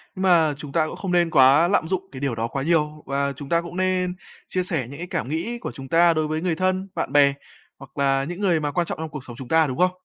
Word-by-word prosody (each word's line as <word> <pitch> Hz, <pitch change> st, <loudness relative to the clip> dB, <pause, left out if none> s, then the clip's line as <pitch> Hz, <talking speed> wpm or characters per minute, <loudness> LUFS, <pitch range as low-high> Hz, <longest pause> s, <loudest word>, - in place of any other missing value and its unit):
mà 175 Hz, -5 st, +3 dB
chúng 145 Hz, -2 st, -9 dB
ta 155 Hz, 0 st, +1 dB
cũng -, -, -7 dB
không 190 Hz, -2 st, -4 dB
nên 175 Hz, -1 st, +3 dB
quá 140 Hz, +4 st, +6 dB
lạm 175 Hz, -4 st, +1 dB
dụng 190 Hz, +1 st, -2 dB
cái 130 Hz, -, -8 dB
điều 135 Hz, -4 st, -1 dB
đó 115 Hz, +1 st, -2 dB
quá 135 Hz, +2 st, -4 dB
nhiều 150 Hz, -1 st, 0 dB
và 140 Hz, +1 st, -1 dB
chúng 140 Hz, 0 st, -9 dB
ta 170 Hz, 0 st, +2 dB
cũng 170 Hz, +1 st, -8 dB
nên 185 Hz, -1 st, 0 dB, 0.3 s
chia 185 Hz, -, -1 dB
sẻ 155 Hz, -9 st, -2 dB
những 140 Hz, -, -9 dB
cái 175 Hz, +2 st, -6 dB
cảm 125 Hz, -, -3 dB
nghĩ 175 Hz, +10 st, -3 dB
của -, -, -5 dB
chúng 135 Hz, -1 st, -10 dB
ta 170 Hz, +3 st, +4 dB
đối 155 Hz, -1 st, 0 dB
với 155 Hz, +1 st, -2 dB
người 175 Hz, -2 st, 0 dB
thân, 185 Hz, +2 st, 0 dB
bạn -, -, -3 dB
bè, 140 Hz, -1 st, +5 dB, 0.5 s
hoặc 135 Hz, +1 st, -14 dB
là 135 Hz, -1 st, +2 dB
những 175 Hz, +6 st, -6 dB
người 175 Hz, -5 st, +2 dB
mà 145 Hz, -1 st, -2 dB
quan 170 Hz, +3 st, -1 dB
trọng -, -, -4 dB
trong 160 Hz, -1 st, -4 dB
cuộc 145 Hz, -3 st, -8 dB
sống 120 Hz, -, -10 dB
chúng 130 Hz, -1 st, -9 dB
ta, 160 Hz, 0 st, +3 dB
đúng 130 Hz, -, -4 dB
không? 180 Hz, +1 st, +3 dB
160 Hz, 285 wpm, -23 LUFS, 140-180 Hz, 0.5 s, quá